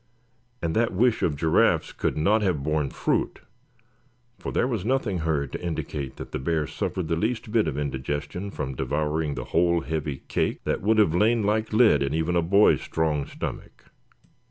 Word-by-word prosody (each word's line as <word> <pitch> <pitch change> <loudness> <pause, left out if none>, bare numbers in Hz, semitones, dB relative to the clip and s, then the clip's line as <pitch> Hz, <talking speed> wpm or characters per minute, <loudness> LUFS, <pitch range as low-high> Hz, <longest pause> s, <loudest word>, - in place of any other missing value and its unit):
And 80 -1 -1
that 115 -1 +2
wish 115 +4 +2
of 75 - +1
Giraffe's 80 +2 +2
could - - -2
not 105 +8 +3
have 90 -9 0
borne 75 -1 0
fruit, - - -1 1.0
for - - -5
there - - +1
was 115 -8 -2
nothing 115 -6 0
heard 75 -4 -1
to - - -6
indicate 75 -5 -4
that - - -9
the - - -3
bear 80 +3 0
suffered 80 +2 -3
the 80 - 0
least 110 +4 -2
bit 110 -5 +2
of 75 -3 -2
indigestion 75 +6 -3
from 70 -8 -4
devouring 75 +3 -1
the - - -5
whole 85 0 +3
heavy 75 -4 -4
cake - - -1
that - - -1
would 110 +3 +2
have 105 -7 +4
lain 110 +5 +3
like 110 +2 0
lead 110 - +5
in 70 +2 0
even 80 +2 0
a 85 - +3
boy's 100 +5 +4
strong 75 -3 -1
stomach. - - -7
80 Hz, 180 wpm, -25 LUFS, 75-105 Hz, 1.0 s, lead